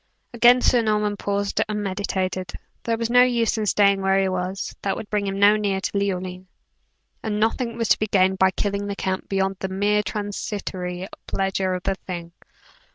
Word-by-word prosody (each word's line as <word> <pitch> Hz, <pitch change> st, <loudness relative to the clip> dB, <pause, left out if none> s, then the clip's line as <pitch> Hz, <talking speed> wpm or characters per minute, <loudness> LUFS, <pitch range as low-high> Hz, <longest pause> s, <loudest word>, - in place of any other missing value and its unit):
Again 240 Hz, +1 st, +6 dB
Sir 245 Hz, -1 st, +4 dB
Norman 210 Hz, -2 st, +1 dB
paused 200 Hz, 0 st, -1 dB
and 210 Hz, -1 st, -2 dB
meditated. 185 Hz, -2 st, -2 dB, 0.3 s
There 230 Hz, -1 st, -1 dB
was 230 Hz, 0 st, -2 dB
no 245 Hz, 0 st, +7 dB
use 240 Hz, -2 st, +2 dB
in 215 Hz, -, -1 dB
staying 200 Hz, -1 st, +3 dB
where 195 Hz, 0 st, +3 dB
he 195 Hz, -, +2 dB
was, 185 Hz, +1 st, -3 dB
that 195 Hz, -, -1 dB
would 210 Hz, -, -8 dB
bring 205 Hz, -1 st, 0 dB
him 195 Hz, 0 st, -2 dB
no 205 Hz, +1 st, +6 dB
nearer 200 Hz, -2 st, 0 dB
to -, -, -3 dB
Leoline, 185 Hz, -2 st, -2 dB, 0.7 s
and 210 Hz, -1 st, -2 dB
nothing 230 Hz, +2 st, 0 dB
was 230 Hz, -2 st, -1 dB
to -, -, +4 dB
be 215 Hz, -, 0 dB
gained 190 Hz, -1 st, +2 dB
by 190 Hz, -, +5 dB
killing 200 Hz, +1 st, -2 dB
the 200 Hz, -, -3 dB
count 190 Hz, -1 st, -3 dB
beyond 195 Hz, 0 st, 0 dB
the 190 Hz, -, -3 dB
mere 205 Hz, +2 st, +1 dB
transitory 190 Hz, -3 st, -4 dB, 0.2 s
pleasure 190 Hz, -1 st, -1 dB
of 180 Hz, -, -6 dB
the 195 Hz, -, +1 dB
thing. 175 Hz, -3 st, -7 dB
200 Hz, 190 wpm, -23 LUFS, 190-210 Hz, 0.7 s, no